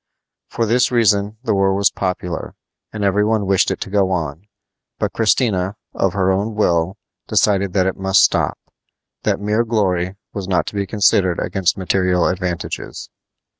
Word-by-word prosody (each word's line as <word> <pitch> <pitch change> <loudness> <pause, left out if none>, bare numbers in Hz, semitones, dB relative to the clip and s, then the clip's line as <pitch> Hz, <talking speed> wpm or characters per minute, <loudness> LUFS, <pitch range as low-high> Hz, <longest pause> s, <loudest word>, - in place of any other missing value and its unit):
For 115 - -1
this 120 +3 +2
reason 105 -3 +2
the - - 0
war 95 -1 +2
was 100 0 +3
popular, 90 -2 -4 0.4
and 105 -1 -4
every 100 +1 +2
one 110 -1 +1
wished 95 0 +2
it - - -3
to - - -4
go 100 -2 +2
on; 85 0 -3 0.5
but - - -2
Christina, 105 -4 +1 0.2
of 95 -2 0
her 95 -1 +1
own 105 +3 -1
will, 90 -2 +1 0.3
decided 100 -3 +2
that 95 -2 +2
it 95 - -1
must 95 0 +4
stop, - - +1 0.6
that - - 0
mere 105 +3 +1
glory 95 -5 0 0.2
was 100 -3 -5
not 90 -3 +1
to - - -6
be 100 -1 -2
considered 95 -4 +2
against 95 -5 0
material 90 -1 +1
advantages. 90 -2 -4
95 Hz, 165 wpm, -19 LUFS, 90-105 Hz, 0.6 s, must